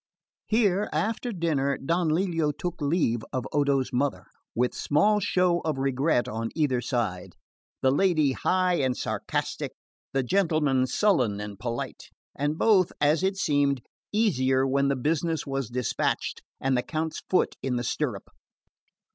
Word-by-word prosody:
Here, 210 Hz, -3 st, +2 dB
after 230 Hz, +3 st, -1 dB
dinner, 150 Hz, -7 st, 0 dB
Don 165 Hz, +3 st, 0 dB
Lelio 165 Hz, -2 st, +1 dB
took 170 Hz, +3 st, -5 dB
leave 145 Hz, -6 st, +1 dB
of 130 Hz, -2 st, -2 dB
Odo's 140 Hz, -3 st, +1 dB
mother, 140 Hz, +3 st, 0 dB, 0.3 s
with 125 Hz, +1 st, +1 dB
small 210 Hz, +9 st, +2 dB
show 180 Hz, -3 st, +2 dB
of 155 Hz, -4 st, -2 dB
regret 135 Hz, 0 st, +1 dB
on 115 Hz, +1 st, -3 dB
either 140 Hz, -6 st, +1 dB
side; 115 Hz, -7 st, -2 dB, 0.5 s
the 130 Hz, -, +5 dB
lady 155 Hz, -2 st, +3 dB
high 180 Hz, +5 st, +1 dB
and 130 Hz, -2 st, 0 dB
sarcastic, -, -, -3 dB, 0.4 s
the 135 Hz, -1 st, 0 dB
gentleman 150 Hz, -5 st, +2 dB
sullen 125 Hz, -, +2 dB
and 105 Hz, -1 st, -7 dB
polite; 120 Hz, 0 st, -4 dB, 0.3 s
and 145 Hz, +3 st, -1 dB
both, 190 Hz, -4 st, +4 dB
as 150 Hz, +3 st, +3 dB
it 190 Hz, +1 st, 0 dB
seemed, 145 Hz, -, +1 dB, 0.3 s
easier 135 Hz, -, +2 dB
when 140 Hz, +1 st, +2 dB
the 140 Hz, -, +1 dB
business 160 Hz, +4 st, -1 dB
was 135 Hz, -4 st, -3 dB
despatched 125 Hz, -1 st, -1 dB, 0.2 s
and 135 Hz, 0 st, +1 dB
the 125 Hz, -, +2 dB
Count's 160 Hz, +3 st, -3 dB
foot 185 Hz, -, +2 dB
in 130 Hz, -2 st, -1 dB
the 120 Hz, -, -1 dB
stirrup. 125 Hz, -4 st, -2 dB
145 Hz, 145 wpm, -27 LUFS, 130-175 Hz, 0.5 s, the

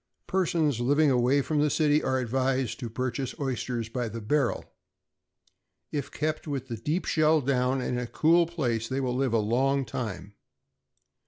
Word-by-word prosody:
= -, -, -52 dB
Persons 165 Hz, -8 st, +1 dB
living 145 Hz, +4 st, +3 dB
away 130 Hz, +3 st, +3 dB
from 155 Hz, +1 st, 0 dB
the 150 Hz, +1 st, +3 dB
city 150 Hz, 0 st, +3 dB
are 130 Hz, -, 0 dB
advised 130 Hz, 0 st, -1 dB
to 120 Hz, -3 st, -5 dB
purchase 130 Hz, +2 st, -3 dB
oysters 125 Hz, -4 st, -2 dB
by 120 Hz, 0 st, -3 dB
the 115 Hz, +2 st, -6 dB
barrel. 130 Hz, +4 st, 0 dB, 1.3 s
If 145 Hz, -3 st, -3 dB
kept 155 Hz, +1 st, -3 dB
with 135 Hz, -3 st, -4 dB
the 115 Hz, -, -4 dB
deep 150 Hz, -, -2 dB
shell 155 Hz, 0 st, +3 dB
down, 130 Hz, -1 st, +1 dB
and 125 Hz, 0 st, -2 dB
in -, -, -2 dB
a -, -, -5 dB
cool 165 Hz, +6 st, +3 dB
place, 120 Hz, -10 st, -2 dB
they 130 Hz, +2 st, -2 dB
will 125 Hz, -2 st, -1 dB
live 130 Hz, -2 st, 0 dB
a -, -, +4 dB
long 130 Hz, +6 st, +1 dB
time. 110 Hz, -4 st, -5 dB
130 Hz, 175 wpm, -27 LUFS, 120-150 Hz, 1.3 s, a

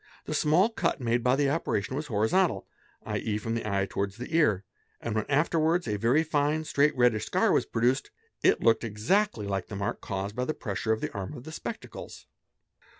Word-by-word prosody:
The -, -, -3 dB
small 170 Hz, +8 st, +3 dB
cut 180 Hz, -10 st, -1 dB
made 120 Hz, -1 st, 0 dB
by 125 Hz, +1 st, +4 dB
the 140 Hz, 0 st, +2 dB
operation 130 Hz, -7 st, -1 dB
was: 150 Hz, +2 st, -3 dB
horizontal, 110 Hz, -, +1 dB, 0.4 s
7.e., 105 Hz, -1 st, -2 dB
from 115 Hz, +1 st, -3 dB
the 115 Hz, -2 st, -2 dB
eye 100 Hz, -1 st, +1 dB
towards 100 Hz, +2 st, -3 dB
the 125 Hz, +6 st, -5 dB
ear, 105 Hz, -, +3 dB, 0.4 s
and 115 Hz, -, -3 dB
when 110 Hz, -1 st, -1 dB
afterwards 160 Hz, +3 st, +2 dB
a 105 Hz, -, 0 dB
very 120 Hz, +9 st, +3 dB
fine, 150 Hz, 0 st, +1 dB
straight 145 Hz, -1 st, +2 dB
reddish 120 Hz, -3 st, +3 dB
scar -, -, +2 dB
was -, -, +2 dB
produced, 125 Hz, +4 st, +1 dB, 0.3 s
it -, -, +3 dB
looked 115 Hz, 0 st, +4 dB
exactly 115 Hz, -, 0 dB
lke 95 Hz, -2 st, -3 dB
a 105 Hz, -, -5 dB
mark 100 Hz, +1 st, -3 dB
caused 100 Hz, +1 st, -4 dB
by 125 Hz, -, -1 dB
the 155 Hz, -, -2 dB
pressure 105 Hz, -1 st, -2 dB
of 110 Hz, -, 0 dB
the -, -, -3 dB
arm 100 Hz, +8 st, -5 dB
of 125 Hz, -, -9 dB
the 160 Hz, -, -9 dB
spectacles. -, -, -7 dB
120 Hz, 200 wpm, -28 LUFS, 105-150 Hz, 0.4 s, by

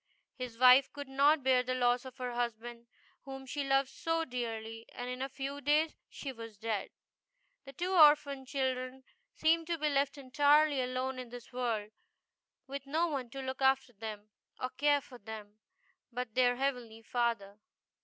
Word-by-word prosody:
His 250 Hz, -3 st, -7 dB
wife 255 Hz, +2 st, +7 dB
could 285 Hz, -1 st, -7 dB
not 280 Hz, +2 st, +3 dB
bear 255 Hz, -1 st, +4 dB
the 255 Hz, 0 st, -2 dB
loss 245 Hz, 0 st, +2 dB
of 260 Hz, 0 st, -10 dB
her 250 Hz, -2 st, -4 dB
husband, 235 Hz, 0 st, -4 dB, 0.3 s
whom 270 Hz, -1 st, -8 dB
she 285 Hz, +2 st, -3 dB
loved 270 Hz, 0 st, +2 dB
so 330 Hz, 0 st, -1 dB
dearly, 225 Hz, -3 st, -5 dB
and 245 Hz, 0 st, -5 dB
in 250 Hz, +1 st, -5 dB
a 270 Hz, -, -2 dB
few 275 Hz, +1 st, -5 dB
days 300 Hz, +3 st, +2 dB
she 275 Hz, -, -6 dB
was 230 Hz, -3 st, -10 dB
dead. 220 Hz, -1 st, -2 dB, 0.8 s
The 275 Hz, -, -10 dB
two 355 Hz, +7 st, -2 dB
orphan 295 Hz, -5 st, +5 dB
children 260 Hz, -1 st, -2 dB, 0.3 s
seemed 325 Hz, +1 st, +2 dB
to 340 Hz, -1 st, -1 dB
be 305 Hz, -1 st, +1 dB
left 280 Hz, 0 st, +1 dB
entirely 285 Hz, +1 st, +4 dB
alone 255 Hz, +1 st, -2 dB
in 250 Hz, -2 st, -7 dB
the 245 Hz, 0 st, -9 dB
world, 230 Hz, -4 st, -2 dB, 0.7 s
with 275 Hz, 0 st, -7 dB
no 325 Hz, +4 st, +1 dB
one 265 Hz, -5 st, -3 dB
to 270 Hz, +2 st, -6 dB
look 260 Hz, +1 st, -5 dB
after 265 Hz, -1 st, +3 dB
them, 215 Hz, 0 st, -8 dB, 0.3 s
or 255 Hz, -, -3 dB
care 290 Hz, +1 st, +2 dB
for 255 Hz, -3 st, -13 dB
them, 215 Hz, -1 st, -9 dB, 0.5 s
but 245 Hz, -2 st, -4 dB
their 245 Hz, 0 st, +3 dB
Heavenly 245 Hz, -4 st, -3 dB
Father. 230 Hz, -4 st, -1 dB
255 Hz, 170 wpm, -32 LUFS, 240-280 Hz, 0.8 s, wife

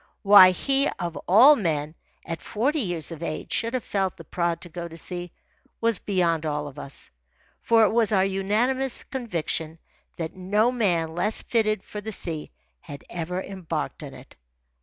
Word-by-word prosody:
Why 200 Hz, -2 st, +9 dB
he, 275 Hz, +9 st, +1 dB
of 175 Hz, -3 st, -4 dB
all 250 Hz, +11 st, +8 dB
men, 155 Hz, -, -2 dB, 0.3 s
at 165 Hz, -3 st, -5 dB
forty 270 Hz, -, -1 dB
years 175 Hz, -, -3 dB
of 165 Hz, -1 st, -8 dB
age, 155 Hz, -2 st, -5 dB
should 230 Hz, +2 st, -1 dB
have 250 Hz, -, -2 dB
felt 195 Hz, -2 st, -2 dB
the 165 Hz, -, -10 dB
prod 170 Hz, +1 st, -1 dB
to -, -, -6 dB
go 170 Hz, +1 st, -6 dB
to 165 Hz, 0 st, -11 dB
sea, 175 Hz, 0 st, -4 dB, 0.5 s
was 230 Hz, -2 st, +2 dB
beyond 170 Hz, -5 st, 0 dB
all 150 Hz, -1 st, -2 dB
of 145 Hz, 0 st, -10 dB
us; 140 Hz, -, -7 dB, 0.5 s
for 230 Hz, -1 st, +4 dB
it 210 Hz, -, +3 dB
was 225 Hz, -1 st, +2 dB
our 190 Hz, -2 st, +3 dB
unanimous 225 Hz, +7 st, 0 dB
conviction 165 Hz, -, -3 dB, 0.4 s
that 165 Hz, -2 st, -5 dB
no 205 Hz, +6 st, +1 dB
man 175 Hz, -10 st, 0 dB
less 210 Hz, +6 st, -1 dB
fitted 215 Hz, -4 st, 0 dB
for 210 Hz, -, -7 dB
the 220 Hz, +2 st, -6 dB
sea 165 Hz, -6 st, -1 dB, 0.3 s
had 140 Hz, -, -10 dB
ever 180 Hz, +2 st, -3 dB
embarked 190 Hz, -4 st, -5 dB
on -, -, -8 dB
it. -, -, -15 dB
185 Hz, 175 wpm, -25 LUFS, 165-220 Hz, 0.5 s, Why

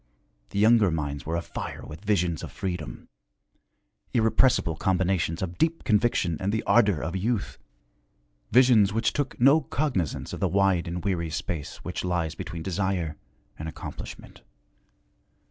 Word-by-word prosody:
The -, -, -6 dB
younger 110 Hz, -1 st, +5 dB
minds 75 Hz, -3 st, -3 dB
were 80 Hz, -, -1 dB
afire 85 Hz, -, -5 dB
with 80 Hz, +5 st, -10 dB
visions 90 Hz, -7 st, +1 dB
of -, -, -7 dB
freedom, 90 Hz, -2 st, -5 dB, 1.1 s
irrepressible 115 Hz, -6 st, +3 dB
combinations 90 Hz, -2 st, 0 dB
of 85 Hz, -1 st, -5 dB
deep 165 Hz, +1 st, +1 dB
conviction 105 Hz, -7 st, +2 dB
and 95 Hz, +2 st, -1 dB
the 110 Hz, +1 st, -1 dB
ardor 105 Hz, -9 st, +3 dB
of 85 Hz, +3 st, -3 dB
youth, 105 Hz, +2 st, -2 dB, 0.9 s
visions 120 Hz, -5 st, +6 dB
which 115 Hz, +1 st, +1 dB
took 145 Hz, -2 st, -2 dB
no 140 Hz, +6 st, +6 dB
cognizance 130 Hz, -, -2 dB
of -, -, -5 dB
the 95 Hz, -, +2 dB
wide 95 Hz, -2 st, +2 dB
and 85 Hz, +1 st, -4 dB
weary 85 Hz, -4 st, 0 dB
space 80 Hz, -1 st, -5 dB
which -, -, -4 dB
lies 85 Hz, -3 st, -1 dB
between 85 Hz, -2 st, -6 dB
desire 95 Hz, -4 st, -1 dB, 0.4 s
and 80 Hz, +1 st, -4 dB
accomplishment. -, -, -9 dB
95 Hz, 140 wpm, -26 LUFS, 85-110 Hz, 1.1 s, visions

